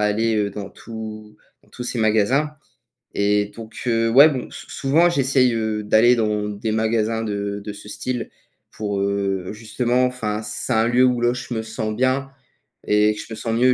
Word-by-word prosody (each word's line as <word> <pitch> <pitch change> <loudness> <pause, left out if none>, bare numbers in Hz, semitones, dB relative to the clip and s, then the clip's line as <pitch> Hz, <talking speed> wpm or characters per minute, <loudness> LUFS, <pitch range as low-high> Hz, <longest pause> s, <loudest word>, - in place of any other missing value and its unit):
aller, 110 +2 +1
heu, 105 -1 0
dans 100 -1 -7
tous 110 -1 -9 0.3
dans - - -27
tous 125 - -7
ces 120 - -3
magasins. 110 +7 +2 0.6
Et 105 0 +2
donc 115 -1 -10
heu, 115 -1 +2
ouais, 140 +6 +8
bon, 130 -5 -4
s - - -10
souvent 155 +5 +3
j'essaye, 135 -5 +2
heu, 110 -1 -1
d'aller 110 +4 +5
dans 105 -2 0
des 105 +2 -3
magasins 110 0 0
de 100 -1 -3
de 105 0 -6
ce 105 0 -11
style 120 +4 -4 0.4
pour, 100 -2 -3
heu, 100 -2 -1
justement, 120 +3 0
enfin 110 -4 -2
c'est 105 +4 -4
un 110 +1 +3
lieu 125 +1 +4
où 125 -1 +3
là 120 0 +3
je 125 0 -6
me 110 - -1
sens 110 -1 -4
bien, 130 +2 +1 0.6
et 105 0 +4
que - - -8
je - - -9
me - - -4
sens 115 +1 -3
mieux, 125 +2 +4
110 Hz, 190 wpm, -22 LUFS, 105-125 Hz, 0.6 s, ouais